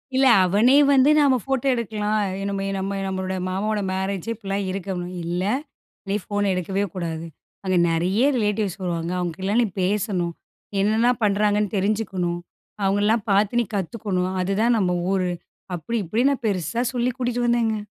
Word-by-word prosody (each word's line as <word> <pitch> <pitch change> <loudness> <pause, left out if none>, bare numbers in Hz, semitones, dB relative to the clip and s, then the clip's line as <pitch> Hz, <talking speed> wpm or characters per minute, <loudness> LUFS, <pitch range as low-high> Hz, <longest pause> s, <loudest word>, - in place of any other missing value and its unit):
இல்ல 270 - +4 0.2
அவனே 210 +9 +4 0.2
வந்து, 270 +2 +5
நம்ம 275 -2 +4
ஃபோட்டோ 270 -1 -1
எடுக்கலாம், 215 -2 -1 0.3
நம்ம 195 0 -2
நம்ம 195 +1 -2
நம்மளோட 190 0 -2
மாமாவோட 205 +3 -1
மேரேஜு 190 +1 -3
இப்டிலாம் 200 -3 -3
இருக்கணும். 185 -2 -4
இல்ல 175 +2 -1 0.7
நீ 200 - +1
ஃபோன் 205 -1 -1
எடுக்கவே 190 +2 -1
கூடாது. 165 -3 -4 0.4
அங்க 185 -2 +1
நெறய 180 +7 +1
ரிலேட்டிவ்ஸ் 210 -4 -1
வருவாங்க, 170 -1 -2
அவங்க 175 -2 -2
கிட்டலாம் 200 +5 +1
நீ - - 0
பேசணும், 185 -3 0 0.5
என்னலாம் 225 +4 +2
பண்றாங்கன்னு 210 0 +2
தெரிஞ்சுக்கணும், 190 -4 -1 0.4
அவங்களலாம் 205 +3 +2
பாத்து 205 +4 +3
நீ 235 - -2
கத்துக்கணும். 190 -1 -2
அதுதான் 210 +6 +2
நம்ம 180 -3 +1 0.2
ஊரு, 185 -2 +1 0.5
அப்டி 225 +8 -3
இப்டின்னு 240 - +2
நான் 260 -3 -7
பெருசா 200 +4 -1
சொல்லி 245 +1 +1
கூட்டிட்டு 245 -1 0
வந்தேங்க. 230 -2 +2
200 Hz, 145 wpm, -23 LUFS, 185-225 Hz, 0.7 s, வந்து